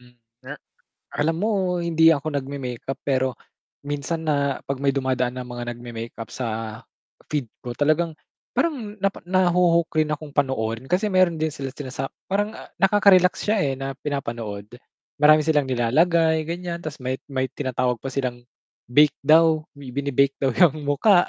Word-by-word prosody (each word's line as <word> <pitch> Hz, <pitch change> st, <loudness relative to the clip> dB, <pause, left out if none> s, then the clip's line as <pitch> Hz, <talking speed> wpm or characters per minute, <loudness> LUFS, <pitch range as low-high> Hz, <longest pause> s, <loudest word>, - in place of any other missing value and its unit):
Hmm, 125 Hz, 0 st, -20 dB, 0.3 s
a -, -, -6 dB, 0.6 s
alam 160 Hz, +2 st, 0 dB
mo 190 Hz, -4 st, 0 dB
hindi 165 Hz, -1 st, +5 dB
ako 150 Hz, -1 st, 0 dB
nag-me-makeup 135 Hz, -1 st, -4 dB
pero 130 Hz, -2 st, 0 dB, 0.5 s
minsan 145 Hz, +3 st, -3 dB
na 140 Hz, -2 st, +1 dB
'pag 140 Hz, -1 st, -4 dB
may 140 Hz, -, +4 dB
dumadaan 130 Hz, -2 st, 0 dB
na 125 Hz, -, -6 dB
mga 120 Hz, -1 st, -5 dB
nag-me-makeup 115 Hz, -1 st, -8 dB
sa 115 Hz, -2 st, -4 dB, 0.5 s
feed 145 Hz, -5 st, -1 dB, 0.2 s
ko, 120 Hz, -, -4 dB
talagang, 155 Hz, +3 st, +2 dB, 0.4 s
parang 245 Hz, -11 st, -1 dB
napa 195 Hz, -1 st, -1 dB
nahuhook 175 Hz, -2 st, +2 dB
rin 155 Hz, -1 st, +1 dB
akong 150 Hz, -1 st, -5 dB
panoorin, 130 Hz, -3 st, -1 dB
kasi 190 Hz, +4 st, +2 dB
meron 185 Hz, -4 st, +3 dB
din 155 Hz, 0 st, 0 dB
sila 135 Hz, -3 st, -5 dB
sila 135 Hz, -1 st, -8 dB
sa 135 Hz, -, -3 dB, 0.2 s
parang, 205 Hz, +2 st, 0 dB, 0.3 s
nakaka-relax 195 Hz, -2 st, +5 dB
siya, 215 Hz, +1 st, +3 dB
eh, 135 Hz, -, 0 dB
na 135 Hz, 0 st, -4 dB
pinapanood. 115 Hz, -8 st, -4 dB, 0.5 s
Marami 155 Hz, +1 st, +7 dB
silang 150 Hz, -4 st, +2 dB
nilalagay 160 Hz, +6 st, +3 dB
ganyan, 170 Hz, 0 st, -4 dB
'tas 155 Hz, -1 st, -6 dB
may 130 Hz, 0 st, -2 dB, 0.2 s
may 130 Hz, 0 st, 0 dB
tinatawag 125 Hz, -3 st, -1 dB
pa 135 Hz, -, -4 dB
silang 125 Hz, -2 st, -3 dB, 0.5 s
bake 150 Hz, +3 st, +5 dB
daw, 160 Hz, +1 st, +5 dB
may 135 Hz, -3 st, -9 dB
binibake 140 Hz, 0 st, +1 dB
'yang 140 Hz, +4 st, +4 dB
mukha 175 Hz, +6 st, +4 dB
145 Hz, 150 wpm, -23 LUFS, 130-170 Hz, 0.6 s, Marami